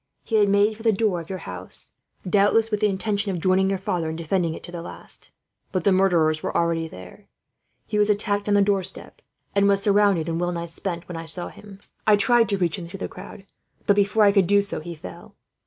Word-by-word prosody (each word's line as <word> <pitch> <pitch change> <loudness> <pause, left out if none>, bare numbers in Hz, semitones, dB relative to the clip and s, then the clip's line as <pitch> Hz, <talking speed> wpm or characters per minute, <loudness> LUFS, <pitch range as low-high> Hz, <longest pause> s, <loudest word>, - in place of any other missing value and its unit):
He 225 - 0
had 205 -1 +4
made 205 +2 +3
for 225 - -13
the 225 0 +3
door 200 -4 0
of 165 - -13
your 190 - -3
house, 90 0 -8 0.4
doubtless 205 +4 +3
with 210 - 0
the 210 - +3
intention 200 +1 -1
of 180 - -3
joining 190 +2 +2
your 195 - 0
father 175 -3 -2
in 160 - -4
defending 165 0 -1
it - - -10
to - - -9
the 170 -1 -6
last; - - -7 0.4
but 185 -3 -1
the 200 - +4
murderers 170 -5 +3
were - - -2
already 165 -1 0
there. 90 - -13 0.6
He 210 - -1
was 210 0 +3
attacked 205 0 0
on 205 - +3
the 200 - +5
doorstep, 195 -2 -3 0.3
and 200 0 +3
was 200 0 +2
surrounded, 200 -5 +3
and 165 0 -2
well 175 0 0
nigh 170 0 -3
spent, 170 +1 -5
when 175 - -6
I 165 - -6
saw 175 +2 -4
him. 200 -1 -14 0.3
I 210 - +7
tried 230 +2 +3
to 200 - +1
reach 175 0 0
him 170 - -7
through 190 +3 -8
the - - -4
crowd 195 - -11 0.4
but, 200 - +4
before 205 +2 +3
I 200 - +6
could 195 -3 +3
do 200 +1 +4
so, 200 - -4
he 170 +2 -7
fell. 150 - -11
195 Hz, 235 wpm, -24 LUFS, 170-205 Hz, 0.6 s, I